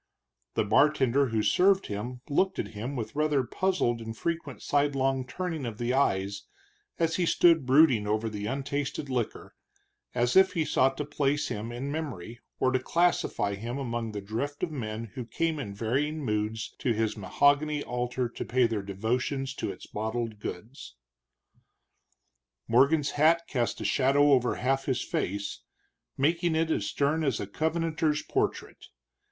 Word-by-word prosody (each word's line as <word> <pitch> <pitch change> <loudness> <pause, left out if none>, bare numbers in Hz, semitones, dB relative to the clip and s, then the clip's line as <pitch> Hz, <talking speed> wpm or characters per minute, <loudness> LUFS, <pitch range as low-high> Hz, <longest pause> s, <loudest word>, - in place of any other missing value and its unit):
The - - +2
bartender 135 +4 +3
who 110 -2 0
served 190 - +4
him 120 +5 -5
looked 190 +6 +1
at - - -3
him 115 +6 -5
with 110 -2 -5
rather 150 -3 +2
puzzled 125 -7 0
and 115 0 -7
frequent 165 -5 -4
sidelong 135 -2 +1
turning 165 +2 -4
of 115 -4 -5
the 120 +2 -1
eyes 100 -6 +1 0.6
as 165 -1 +1
he 175 -2 +1
stood 165 -7 +4
brooding 130 -6 +5
over 110 +2 0
the 105 -1 -4
untasted 140 +1 -3
liquor, 120 -3 -3 0.6
as 120 0 +1
if 190 -1 +6
he 165 -4 0
sought 135 -1 +2
to 150 - -2
place 145 0 0
him 110 +3 -4
in 130 +4 -4
memory, 120 - -5 0.2
or 130 - +3
to 130 - +2
classify 170 -10 +1
him 115 +6 -5
among 120 -4 -3
the 105 -1 -5
drift 120 - -4
of 175 - -1
men 115 -5 -4
who 125 -1 -5
came 155 +7 -1
in 115 -8 -5
varying 140 +8 -1
moods 105 0 -2
to 120 - +1
his 110 -1 0
mahogany 145 +8 +2
altar 125 0 -2
to 120 - -6
pay 125 +1 +2
their 115 -3 -1
devotions 125 +7 -2
to - - -4
its 95 - -11
bottled 110 0 -3
gods. 110 +7 -8 1.7
Morgan's 140 +5 +4
hat 165 +3 +4
cast 120 -3 -1
a - - -4
shadow 135 +8 +4
over 125 -3 +3
half 135 +2 0
his 130 -3 0
face, 100 +2 -3 0.6
making 165 +4 +1
it 160 0 +1
as 100 -9 0
stern 145 +6 0
as 135 -6 0
a - - -3
Covenanter's 160 - 0
portrait. - - -2
130 Hz, 160 wpm, -28 LUFS, 115-150 Hz, 1.7 s, if